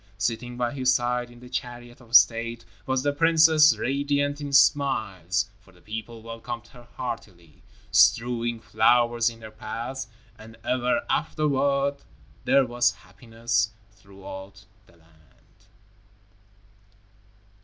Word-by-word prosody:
Sitting 115 +4 -3
by 120 -1 -1
his 130 -2 +2
side 120 0 0
in 120 0 -16
the 125 - -12
chariot 120 0 -7
of 120 -1 -4
state, 115 +2 +4 0.2
was 130 -1 0
the 145 0 +1
princess, 160 0 +5
radiant 145 +2 -1
in 145 -1 -5
smiles, 105 - +2
for 95 - -22
the 90 - -22
people 110 +3 -8
welcomed 115 0 -7
her 120 -1 -16
heartily, 90 - -7 0.3
strewing 120 0 +3
flowers 120 +1 +2
in 115 -1 -13
her 110 - -9
path. 120 +5 -6 0.3
And 110 +1 -13
ever 125 0 0
afterward 140 -2 0 0.5
there 135 +1 +4
was 120 0 +1
happiness 115 +3 -2 0.2
throughout 95 -1 -12 0.2
the - - -22
land. 80 -2 -28
120 Hz, 120 wpm, -25 LUFS, 110-130 Hz, 0.5 s, princess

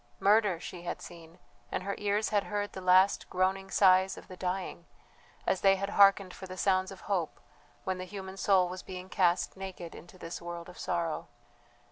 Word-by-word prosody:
Murder 205 -3 +4
she 175 0 -8
had 175 - -4
seen; 165 -1 -12 0.3
and - - -2
her 200 +1 -2
ears 210 +1 +1
had 205 -2 +1
heard 205 0 -3
the 190 - -6
last 185 +2 +4
groaning 190 +1 0
sighs 190 -1 +4
of - - -12
the 185 - -9
dying, 180 -1 -4 0.6
as 190 - +1
they 195 0 +6
had 200 +1 -3
hearkened 195 -2 +5
for 190 - -9
the 185 0 -8
sounds 190 0 +2
of 195 - -11
hope 180 -6 -2 0.4
when 185 -1 -2
the 185 - -4
human 190 0 -7
soul 190 -2 +3
was 180 +1 -6
being 185 0 -8
cast 180 -3 +2
naked 190 -3 -7
into 175 +2 -13
this 165 -1 -7
world 170 0 -6
of 180 - -13
sorrow. 170 -3 -2
185 Hz, 190 wpm, -30 LUFS, 180-195 Hz, 0.6 s, they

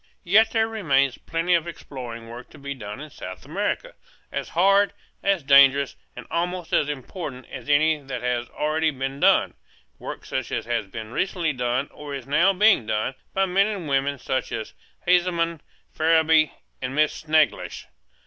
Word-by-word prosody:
There 175 - -5
yet 220 +2 +6
remains 175 - +1
plenty 165 +2 -1
of 170 -1 +2
exploring 125 -8 -8
work 120 +2 -10
to - - -15
be 140 0 -5
done 105 -2 -8
in 150 +1 -9
South 95 -6 -9
America, - - -2 0.4
as - - -4
hard, 195 +4 +4 0.3
as 195 -5 +1
dangerous, 140 0 +6 0.2
and - - -9
almost 175 0 -2
as 150 - +3
important 135 -1 -6
as 130 +1 -8
any 155 +1 +4
that 130 -4 -6
has 120 -1 -1
already 155 +1 0
been 135 -1 -4
done; - - +4 0.5
work - - -7
such - - -3
as - - -2
has 95 - -2
recently 155 - -2
been 135 - -10
done, 125 +3 0
or 145 -1 -7
is 135 - -7
now 165 +8 +4
being 195 - +4
done, 110 +4 -1 0.2
by 195 0 +3
men 195 +2 +3
and 200 -7 -4
women 140 0 +1
such 130 +1 -2
as 110 - -5 0.3
Haseman, 170 -2 +2 0.3
Farrabee, 160 -1 +4 0.3
and 130 +1 -3
Miss 155 0 +3
Snethlage. 155 0 0
150 Hz, 170 wpm, -24 LUFS, 130-175 Hz, 0.5 s, yet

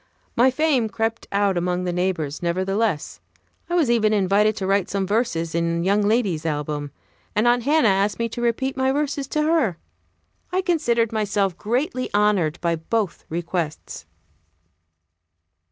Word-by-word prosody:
My 245 +3 +5
fame 260 -4 +1
crept 225 +1 -2
out 200 -2 +1
among 180 +1 -1
the 180 -1 -2
neighbors, 175 -5 -2
nevertheless. 185 +1 -1 0.5
I 350 - 0
was 330 -6 +3
even 215 -2 +3
invited 205 +2 +3
to 195 - -3
write 195 -1 +1
some 195 -1 -1
verses 200 -6 -1
in 170 0 0
young 200 +3 +2
lady's 205 -6 +1
album; 150 -2 -3 0.5
and 215 +3 +2
Aunt 245 0 +4
Hannah 295 -4 +4
asked 195 +2 +1
me 230 - -1
to 240 - -6
repeat 240 +3 0
my 265 0 +1
verses 285 -1 -1
to 300 +2 0
her. 300 - +1 0.7
I 370 +1 0
considered 235 - +1
myself 205 -4 0
greatly 255 - -2
honored 195 -6 +2
by 170 -1 0
both 195 +2 -2
requests. 170 -1 -4
205 Hz, 150 wpm, -23 LUFS, 180-240 Hz, 0.7 s, My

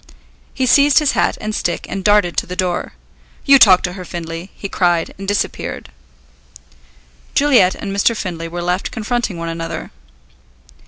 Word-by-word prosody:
He 260 - 0
seized 280 +3 +4
his 300 -2 +4
hat - - 0
and 215 0 -4
stick 175 - -2
and 195 0 -5
darted 205 -4 +3
to - - 0
the 180 - -6
door. 180 -1 -2 0.5
"You 275 -1 +7
talk 185 -6 +7
to 180 - -2
her, 185 -1 -8
Findlay!" 170 +1 -7
he 200 - -6
cried, 175 -3 0
and 195 - -7
disappeared. 205 0 -3 1.5
Juliet 255 -11 +4
and 195 -1 -5
Mr. 220 +3 +2
Findlay 165 -5 -5
were 175 +1 -5
left 180 +2 -1
confronting 230 -3 -3
one 165 0 -4
another. 165 0 -5
185 Hz, 160 wpm, -18 LUFS, 175-215 Hz, 1.5 s, You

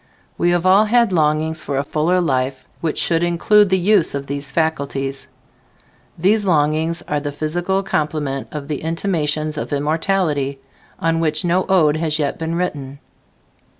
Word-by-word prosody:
We 175 - +1
have 175 0 +1
all 195 +3 +5
had 235 -2 +3
longings 155 0 +1
for 140 - -3
a 140 - +1
fuller 155 +5 +1
life 130 -5 -1
which 160 -2 -2
should 165 -1 +1
include 185 +4 +3
the 190 - +3
use 185 -4 +2
of 140 0 -4
these 140 0 -4
faculties. 140 -3 -2 0.9
These 205 +5 +2
longings 160 -1 +1
are 150 - -2
the 145 0 -4
physical 175 +6 -1
complement 150 -6 -2
of 145 -2 -6
the 150 -2 -4
"Intimations 155 -3 -1
of - - -5
Immortality," 150 -1 0 0.4
on 165 0 0
which 155 0 0
no 180 +2 +1
ode 160 -5 +4
has 160 -1 0
yet 145 -3 -2
been 165 +1 -2
written. 145 -6 -3
160 Hz, 155 wpm, -19 LUFS, 145-175 Hz, 0.9 s, all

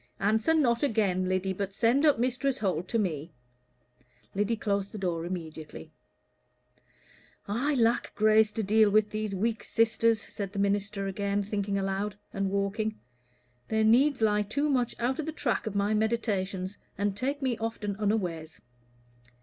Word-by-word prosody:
"Answer 220 +10 +2
not 240 -7 +2
again, 200 -8 +1
Lyddy, 185 +1 0
but 195 +1 -4
send 250 +8 +3
up 290 - +4
Mistress 255 +2 0
Holt 185 -6 -1
to 230 - 0
me." 165 -7 -2 1.0
Lyddy 205 +3 +1
closed 200 -2 -1
the - - -5
door 175 -4 -2
immediately. 160 - -7 1.6
"I 255 +9 0
lack 235 -1 +1
grace 215 0 +4
to 220 - -2
deal 215 +1 +4
with 210 +1 +3
these 215 -2 -3
weak 225 +3 -1
sisters," 230 0 +2
said 200 -2 -7
the - - -6
minister, 200 0 0
again 200 +1 -1
thinking 200 -1 -2
aloud, 195 +1 -2 0.2
and 195 0 -1
walking. 200 +2 -1 0.7
"Their 220 0 +1
needs 250 +3 +4
lie 210 -1 +3
too 280 +9 -1
much 250 -3 0
out 250 +4 0
of 310 - -3
the - - -1
track 260 -8 -1
of 210 - -4
my 200 +1 +1
meditations, 205 -4 -1 0.2
and 200 -1 0
take 275 +6 -2
me 255 -3 +1
often 220 -3 -3
unawares. 180 -7 -2
210 Hz, 155 wpm, -28 LUFS, 195-230 Hz, 1.6 s, up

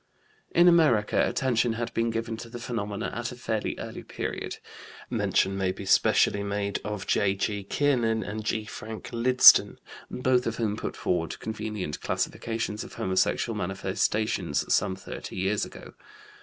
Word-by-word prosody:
In 175 +1 +5
America 150 -12 +4
attention 120 -3 +1
had 115 +1 -4
been 115 0 +1
given 115 0 -3
to 115 +1 -9
the 120 - -7
phenomena 110 -3 -4
at 120 +2 -3
a - - -8
fairly 110 -3 -3
early - - -7
period. - - -5 0.5
Mention 95 0 +1
may 95 -1 0
be 95 +1 -8
specially 100 +1 +3
made 100 0 -2
of 105 -2 -4
J.G. 100 0 0
Kiernan 115 -3 +1
and 110 +1 -5
G. 110 0 -1
Frank 110 0 -8
Lydston, 125 +2 +7 0.3
both 125 -1 +1
of 115 - -2
whom 110 -3 -1
put - - -5
forward 85 -3 -1
convenient 105 -7 -4
classifications 115 -2 -2
of - - -11
homosexual 95 +4 0
manifestations 95 -2 -1
some 95 -1 +2
thirty 95 - -8
years 95 +3 0
ago. - - -12
110 Hz, 145 wpm, -27 LUFS, 100-115 Hz, 0.5 s, Lydston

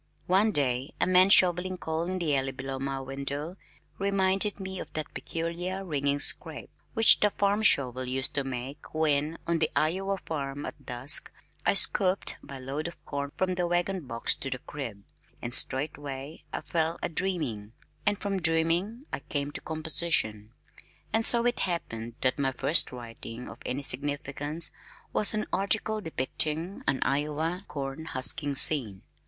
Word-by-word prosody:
One 195 +4 +3
day, 135 -5 0
a - - +3
man 185 +1 +5
shoveling 185 0 +4
coal 160 -1 -3
in 185 +1 -3
the 160 -5 0
alley 135 0 -1
below 135 0 -5
my 135 0 -3
window 140 +5 -5 0.4
reminded 195 +1 +1
me 190 -1 -6
of - - -8
that 155 -2 -5
peculiar 175 +4 -4
ringing 140 -4 0
scrape 140 - -1 0.2
which 225 0 +7
the 210 - +4
farm 200 +1 0
shovel 130 - +2
used 130 +1 -2
to 140 - -1
make 135 +3 -7
when 155 0 +1
(on 170 -1 0
the 155 - +1
Iowa 190 +5 0
farm) 145 -4 -5
at - - -9
dusk 125 +3 +3 0.4
I - - +4
scooped 190 -1 +4
my 140 - -9
load 135 +5 -4
of 170 - -11
corn 140 0 -4
from 185 -1 0
the 180 -1 -1
wagon 175 -2 -1
box 115 0 0
to 135 - -5
the 130 - -3
crib, 120 -7 -8 0.4
and 120 0 -3
straightway 145 +2 0
I - - -4
fell 165 0 -1
a - - +2
dreaming, 155 - -3 0.3
and 205 +3 +1
from 195 -2 -3
dreaming 170 - 0
I - - -2
came 145 +1 -4
to - - -7
composition, 155 -9 -1 0.6
and 225 - +3
so 235 +1 +9
it 245 0 +1
happened 115 -10 -3
that 130 +2 +2
my 135 -1 0
first 140 +6 +2
writing 120 -1 -9
of - - -11
any 135 +3 -3
significance 145 +3 +3 0.4
was 215 - +1
an 215 - -1
article 215 +2 -1
depicting 160 +3 -1
an 135 -1 +1
Iowa 150 +6 -1
corn 140 +1 -5
husking 140 0 0
scene. 120 -10 +3
155 Hz, 160 wpm, -28 LUFS, 135-180 Hz, 0.6 s, so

